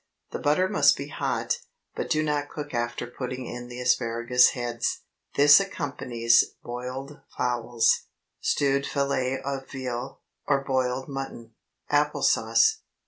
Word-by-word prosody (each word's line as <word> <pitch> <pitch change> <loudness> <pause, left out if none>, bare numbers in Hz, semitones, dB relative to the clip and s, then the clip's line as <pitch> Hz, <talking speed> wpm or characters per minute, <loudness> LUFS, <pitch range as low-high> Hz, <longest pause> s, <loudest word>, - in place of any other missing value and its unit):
The - - -4
butter 150 +6 +2
must 205 - +4
be - - -6
hot, 480 - -1 0.3
but - - -4
do 155 -1 +2
not 145 -1 -1
cook 145 -2 -7
after 120 0 -2
putting 125 +1 -6
in 120 0 -7
the 120 0 -8
asparagus 125 0 +3
heads. 120 -1 -2 0.3
This 145 +3 +8
accompanies 135 -11 +1
boiled 130 +4 -6 0.2
fowls, 120 -1 +1 0.3
stewed 140 -1 +1
fillet 135 -2 0
of 135 -1 -4
veal, 130 0 -5 0.3
or 140 -1 +2
boiled 130 -1 -1
mutton. 135 -5 -7 0.4
APPLE 150 0 +1
SAUCE. 445 0 +3
130 Hz, 130 wpm, -26 LUFS, 120-145 Hz, 0.4 s, This